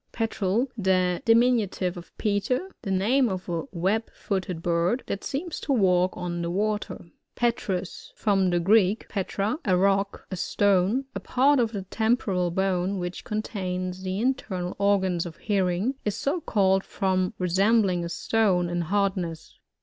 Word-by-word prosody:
Petrel.— 225 +1 0
The 185 -4 +1
diminutive 225 -6 +3
of 175 -1 -10
Peter. 225 - -1
The 200 - -5
name 225 +7 +2
of 185 -1 -4
a 170 +3 -2
web 195 +6 0
footed 185 -4 -3
bird, 175 +8 +1
that 200 - -4
seems 315 +5 -4
to 280 - -1
walk 185 -5 +2
on 175 -1 -3
the 170 - -2
water. 210 +3 -2 0.3
Petrous. 200 -6 -2
—From 195 -3 +2
the 175 0 +2
Greek, 200 +3 +3
petra^ 205 - -2
a 185 -3 +2
rock, 195 +1 +1
a - - -2
stone. 200 +7 +2
A - - -3
part 275 +2 +3
of 230 -2 +1
the 200 -4 -4
tem 220 +5 +1
poral 180 -7 -1
bone, 190 +1 0
which 175 0 -5
contains 185 -4 -3
the 190 +1 -3
internal 205 -8 -2
organs 190 -4 +2
of 165 - -10
hearing, 195 +3 0
is 210 0 -2
so 285 +9 -1
c»llt 195 - +2
d, - - -25
from 185 +1 0
resembling 190 0 +2
a 170 - -4
stone 180 -1 +1
in 175 0 -1
hardness. 185 -2 -2
195 Hz, 155 wpm, -26 LUFS, 180-220 Hz, 0.3 s, diminutive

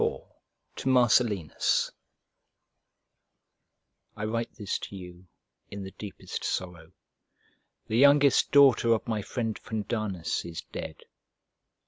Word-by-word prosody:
LIV - - 0 0.6
To 135 - -2
MARCELLINUS 120 - +2 2.3
I 105 - -3
WRITE 115 +1 -3
this 105 -5 -3
to - - -8
you 90 -1 -11 0.4
in 100 0 -7
the 95 - -8
deepest 105 -1 -7
sorrow: 90 -2 -4 0.9
the 110 - 0
youngest 140 0 +5
daughter 135 -5 +6
of 115 - -2
my 110 -2 -1
friend 115 +1 -3
Fundanus 105 -5 -3
is 85 -2 -7
dead! - - -7
110 Hz, 105 wpm, -28 LUFS, 95-120 Hz, 2.3 s, daughter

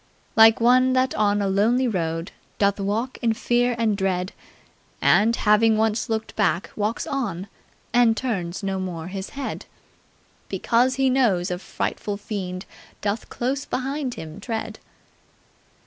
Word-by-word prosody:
"Like 225 0 +7
one 255 +2 +4
that 260 0 +2
on 205 -1 +2
a - - 0
lonely 225 +7 +2
road 165 -5 -2 0.3
Doth 200 0 +2
walk 215 +6 -2
in 230 -2 +2
fear 245 +2 +1
and 225 -3 +1
dread; 190 -1 -1 0.7
And, 230 +2 +4
having 215 +1 +4
once 220 +2 0
looked 220 -1 -3
back, 190 -4 0
walks 215 +2 -1
on 205 -9 -3 0.5
And 240 -2 +4
turns 195 -8 -3
no 195 -1 -1
more 180 -2 -5
his 190 0 -5
head! 275 - -5 0.8
Because 245 +2 +2
he 270 0 +2
knows 205 -10 +2
a 180 - -2
frightful 200 +1 -3
fiend 190 -2 -5 0.4
Doth 205 +2 -2
close 265 +3 -2
behind 265 0 -3
him 160 +4 -8
tread!" 225 +1 -4
215 Hz, 140 wpm, -23 LUFS, 195-245 Hz, 0.8 s, Like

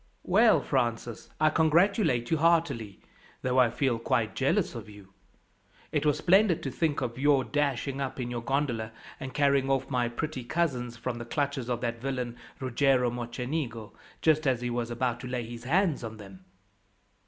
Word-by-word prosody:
"Well, 215 +4 +5
Francis, 120 -3 -2
I 155 0 +4
congratulate 160 - +2
you 160 - +3
heartily, 160 - +1 0.4
though 130 0 +2
I 125 -2 +5
feel 120 0 0
quite 115 -2 0
jealous 165 +8 +1
of 115 -3 -8
you. 100 -2 -14 0.8
It 150 0 +1
was 145 - +3
splendid 190 -1 +3
to 135 - -3
think 150 0 0
of 125 -1 -3
your 140 -1 +4
dashing 140 -1 -1
up 135 -1 -4
in 120 -1 -3
your 120 -1 -3
gondola, 120 -4 -1 0.3
and 135 -1 -6
carrying 140 -1 +2
off 135 0 0
my 120 -2 +1
pretty 130 +2 -4
cousins 125 -5 -1
from 120 0 -4
the 120 - -6
clutches 140 -1 -2
of 120 - -1
that 115 -1 -3
villain, 125 -3 -3 0.2
Ruggiero 130 -1 +2
Mocenigo, 120 -1 -4 0.3
just 155 -1 +3
as 125 -3 +1
he 120 0 -2
was 120 -1 -2
about 120 0 -1
to 125 - -7
lay 125 -1 -2
his 120 +1 -9
hands 165 0 +2
on 110 -1 -6
them." 95 -3 -13
130 Hz, 175 wpm, -28 LUFS, 120-145 Hz, 0.8 s, Well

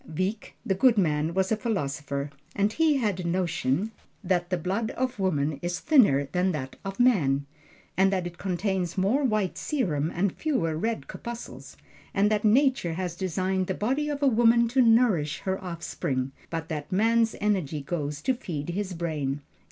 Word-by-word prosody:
Wieck, 185 +7 -3
the 195 - +2
good 230 +4 +4
man, 160 -2 +1
was 190 +1 +1
a - - +4
philosopher, 145 - -3 0.2
and 205 +1 +1
he 315 -1 +3
had 210 -7 0
a - - -3
notion 175 +1 0 0.3
that 175 -1 0
the 180 - 0
blood 195 +7 -1
of 255 -3 -1
woman 150 -6 0
is 175 0 -2
thinner 205 - +4
than 180 +2 +1
that 130 -3 -5
of 195 +2 -6
man 145 - +3 0.5
that 190 -1 +2
it 175 0 -7
contains 190 -1 -1
more 210 +10 +2
white 215 -7 0
serum 165 - -1
and 185 +1 +1
fewer 180 - -1
red 225 +8 -2
corpuscles, 235 0 -8 0.4
and 205 +2 +3
that 210 -1 +1
Nature 245 - +3
has 175 0 -3
designed 185 +1 -1
the 190 - -1
body 270 +8 0
of 290 -1 -3
a - - +5
woman 235 -1 +5
to 255 +3 +3
nourish 225 -11 +3
her 190 0 -2
offspring, 145 -6 -3 0.2
but 165 -1 -4
that 150 -2 -5
man's 225 +3 +3
energy 180 -9 0
goes 145 -2 -3
to 260 - +2
feed 170 - -5
his 190 +1 -3
brain. 150 -4 -2
190 Hz, 170 wpm, -27 LUFS, 160-225 Hz, 0.5 s, a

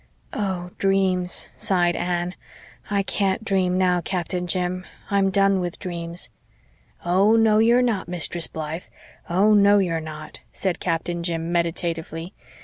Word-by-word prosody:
"Oh 185 -3 -3
dreams," 190 -2 +2
sighed 175 -2 +1
Anne. 175 0 -1 0.6
"I 200 -1 +1
can't 195 +2 -1
dream 185 -2 +1
now, 180 -1 +2
Captain 180 0 -3
Jim 180 +1 -1 0.3
I'm 200 -1 +3
done 195 0 +3
with 175 -1 -3
dreams." 170 -2 -4 0.8
"Oh, 195 +5 +4
no, 220 -1 +4
you're 235 +3 +4
not, 225 -8 0
Mistress 175 -1 0
Blythe 160 +2 -5 0.4
oh, 195 +5 +4
no, 205 0 +6
you're 170 -5 0
not," 155 -1 -9
said 190 -3 -2
Captain 170 0 -2
Jim 170 -1 -2
meditatively. 170 0 -2
180 Hz, 135 wpm, -23 LUFS, 170-195 Hz, 0.8 s, no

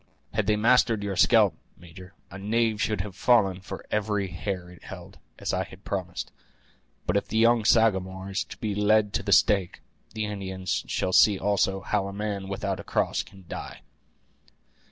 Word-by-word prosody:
Had 105 -2 0
they 105 - +3
mastered 115 -1 +3
your 100 -1 -3
scalp, - - +5 0.2
major, 90 +2 -13 0.2
a 95 - -8
knave 110 +1 0
should 105 -3 0
have 95 -2 -7
fallen 100 -4 +3
for 95 - -8
every 105 -2 0
hair 90 +1 -4
it 90 - -16
held, - - -10 0.2
as - - -3
I 95 - 0 0.2
promised; 90 -2 -4 0.7
but - - 0
if 100 - 0
the 110 - -2
young 115 0 +4
Sagamore 95 -4 +2
is 100 +2 -1
to - - -11
be 105 -2 -3
led 105 0 +2
to - - 0
the 100 +1 -3
stake, 95 -1 +3 0.4
the 110 -1 -1
Indians 95 -2 -3
shall 95 - -1
see 105 +1 +6
also 95 -1 +1
how 100 +2 -1
a 100 - -6
man 100 -1 -3
without 100 - -3
a - - -7
cross - - 0
can 95 -2 -15
die." - - -7
100 Hz, 175 wpm, -26 LUFS, 95-105 Hz, 0.7 s, see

